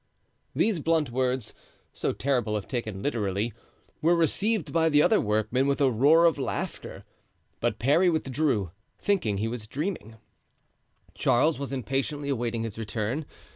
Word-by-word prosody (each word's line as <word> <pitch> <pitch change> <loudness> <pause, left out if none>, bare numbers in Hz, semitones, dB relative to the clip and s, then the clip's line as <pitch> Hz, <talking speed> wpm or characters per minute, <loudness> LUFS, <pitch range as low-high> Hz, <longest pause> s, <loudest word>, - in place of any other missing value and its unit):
These 215 -6 +2
blunt 155 -4 +1
words, 130 -1 -1 0.4
so - - -1
terrible 120 -6 0
if 100 - -6
taken 110 -7 -4
literally, 105 -4 -1 0.5
were 170 +3 +4
received 195 +4 0
by 165 -1 +3
the 150 -1 +5
other 220 - +4
workmen 110 +5 +1
with 140 - +1
a 135 -2 +4
roar 145 +9 +5
of 165 -4 +3
laughter. 130 - -4 0.5
But - - 0
Parry 155 +9 +3
withdrew, 135 - 0 0.3
thinking 175 - 0
he 110 +3 -1
was 115 -2 -5
dreaming. 145 - -4 1.0
Charles 150 +5 +2
was 140 -1 -4
impatiently 135 +2 -2
awaiting 120 -3 -1
his 115 -1 -5
return. 115 +7 -3
135 Hz, 140 wpm, -27 LUFS, 115-155 Hz, 1.0 s, the